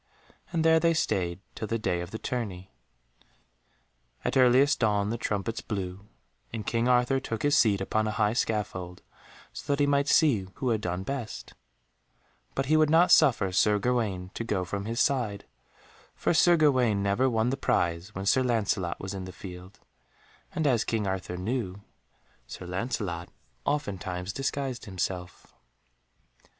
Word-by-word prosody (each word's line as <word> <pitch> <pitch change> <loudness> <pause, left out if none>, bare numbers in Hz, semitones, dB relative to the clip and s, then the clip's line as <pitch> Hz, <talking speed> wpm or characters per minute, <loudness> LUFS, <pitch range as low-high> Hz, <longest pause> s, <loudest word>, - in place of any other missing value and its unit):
And 165 -2 0
there 160 0 +6
they 165 0 +2
stayed 90 - -1
till 110 - -5
the 115 - -1
day 90 -5 -1
of 85 - -6
the 110 - -5
tourney. 100 -7 -4 1.5
At - - 0
earliest 130 +3 +5
dawn 105 -2 +1
the 115 - -2
trumpets 105 +1 -2
blew, 100 -1 -5 0.4
and 110 -2 -5
King 115 +2 0
Arthur 125 +2 +3
took 115 -4 -5
his 145 0 +3
seat 105 -8 +4
upon 110 +3 0
a 105 - -3
high 105 0 +2
scaffold, 95 -6 -2 0.5
so - - -5
that 140 - +1
he 145 - +4
might 140 0 +2
see 130 - +3
who 130 - -2
had 110 -2 +1
done 90 -1 -3
best; 130 -2 -5 1.0
but 135 - 0
he 155 +3 +3
would 155 -1 +4
not 165 +3 +5
suffer 120 - +5
Sir 105 +3 +3
Gawaine 105 -6 -1
to - - -4
go 100 -5 -1
from 100 +3 -4
his 115 +2 -3
side, 115 -7 0 0.7
for - - 0
Sir 175 +1 +5
Gawaine 125 -9 +3
never 100 +7 +2
won 115 +1 +1
the - - 0
prize 85 -6 -1
when 95 +1 -4
Sir 130 +6 +4
Lancelot 105 -7 0
was 95 +1 -5
in 95 -1 -5
the 95 - -8
field, 90 +1 -11 0.7
and 160 - 0
as 125 -6 +3
King 110 -2 -1
Arthur 95 -2 -3
knew, 100 -1 -3 0.6
Sir - - -8
Lancelot 90 -2 -3 0.4
oftentimes 100 -9 -2
disguised 135 -2 -3
himself. 90 -2 -5
110 Hz, 160 wpm, -28 LUFS, 95-130 Hz, 1.5 s, there